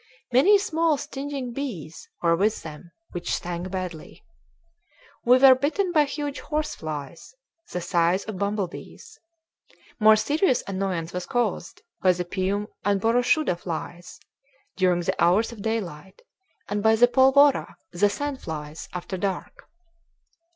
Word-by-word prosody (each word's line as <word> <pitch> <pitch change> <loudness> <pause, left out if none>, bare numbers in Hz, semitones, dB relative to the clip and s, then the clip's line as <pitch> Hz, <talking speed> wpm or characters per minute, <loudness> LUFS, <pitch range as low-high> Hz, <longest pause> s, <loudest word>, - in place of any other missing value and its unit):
Many 345 +12 +6
small 330 -5 +1
stinging 275 -3 -5
bees 200 - -6
were 170 0 +4
with 210 +5 0
them, 160 +2 -10 0.2
which 175 0 -2
stung 175 -1 -4
badly. 180 -4 -6 1.0
We 250 +1 +7
were 265 0 +8
bitten 310 +9 0
by 305 -3 +4
huge 290 0 -4
horse 305 0 -2
flies, 155 - -7 0.4
the 180 - -3
size 175 +2 +1
of 215 -4 -7
bumblebees. 205 - -5 0.8
More 215 0 +7
serious 290 - +1
annoyance 185 -4 -3
was 180 0 -4
caused 230 -8 -2 0.2
by 185 -1 +5
the 180 0 -4
pium 190 +3 -1 0.2
and 200 -1 +2
boroshuda 245 - +2
flies 175 0 -7 0.6
during 180 -2 +2
the 170 - -1
hours 190 +8 +3
of 225 -3 -10
daylight, 195 - -4 0.4
and 205 0 -2
by 220 +1 +4
the 240 +2 +6
polvora, 265 +2 +4 0.2
the 200 +4 +2
sand 285 +5 -4
flies, 150 -1 -7
after 180 +2 -5
dark. 200 - -4
205 Hz, 135 wpm, -25 LUFS, 175-265 Hz, 1.0 s, were